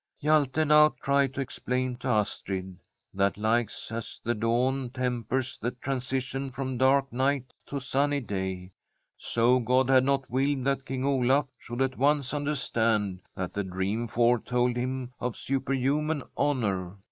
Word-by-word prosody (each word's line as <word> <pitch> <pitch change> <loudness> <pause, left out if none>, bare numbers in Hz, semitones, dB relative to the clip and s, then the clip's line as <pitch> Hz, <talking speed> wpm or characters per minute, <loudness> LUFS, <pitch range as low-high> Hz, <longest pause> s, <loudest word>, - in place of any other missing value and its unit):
Hjalte 150 0 +2
now 150 0 +6
tried 140 -1 +3
to 140 - -1
explain 125 -1 -2
to 130 - -6
Astrid 95 -5 -1 0.3
that 100 +1 +1
like 110 +1 +1 0.2
as 115 0 -5
the 120 - +1
dawn 125 +4 0
tempers 125 0 -2
the 120 - -1
transition 130 +1 -3
from 130 -1 -4
dark 135 0 +3
night 130 0 0
to 140 - -3
sunny 140 +2 +1
day, 95 -5 -4 0.4
so 120 +2 +2
God 125 +2 +2
had 130 -1 +6
not 135 0 +1
willed 135 +1 0
that 135 0 0
King 130 0 -2
Olaf 135 +1 +3
should 120 +3 -2
at 130 -1 -3
once 140 -1 +2
understand 115 -9 0
that 95 -1 -4
the 100 - -1
dream 95 +5 -2
foretold 120 +1 +2
him 125 0 -3
of 125 -2 -3
superhuman 135 +3 0
honour. 100 -9 0
130 Hz, 145 wpm, -28 LUFS, 115-135 Hz, 0.4 s, now